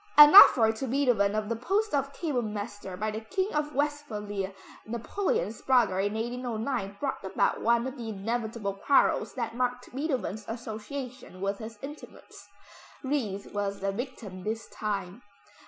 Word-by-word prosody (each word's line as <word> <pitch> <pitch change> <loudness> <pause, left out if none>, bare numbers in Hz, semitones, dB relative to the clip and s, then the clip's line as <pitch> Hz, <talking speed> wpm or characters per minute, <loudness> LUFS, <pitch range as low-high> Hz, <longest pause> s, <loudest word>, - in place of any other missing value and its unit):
An 295 0 +11
offer 240 - +10
to 245 +4 -5
Beethoven 240 -6 +2
of 215 -1 -1
the 230 - -1
post 395 - 0
of 275 -1 0
Kapellmeister 215 - -4
by 215 +1 -1
the 215 +1 -5
King 375 - -2
of 300 -1 -1
Westphalia, 210 -10 -2 0.4
Napoleon's 235 - -2
brother, 235 -8 +3
in 205 +2 0
1809 230 -2 -3
brought 275 -6 -3
about 190 - 0
one 235 +1 +3
of 265 +1 -5
the 230 -2 -5
inevitable 220 0 -3
quarrels 235 +8 +2
that 230 -3 -3
marked 250 0 -2
Beethoven's 260 - -2
association 235 0 -7
with 195 +1 -2
his 225 -1 -8
intimates. 295 +2 -11 0.6
Ries 235 -8 -2
was 200 -1 -2
the 195 0 -1
victim 205 -5 -6
this 220 +2 -3
time. 200 0 -4
230 Hz, 145 wpm, -28 LUFS, 205-265 Hz, 0.6 s, An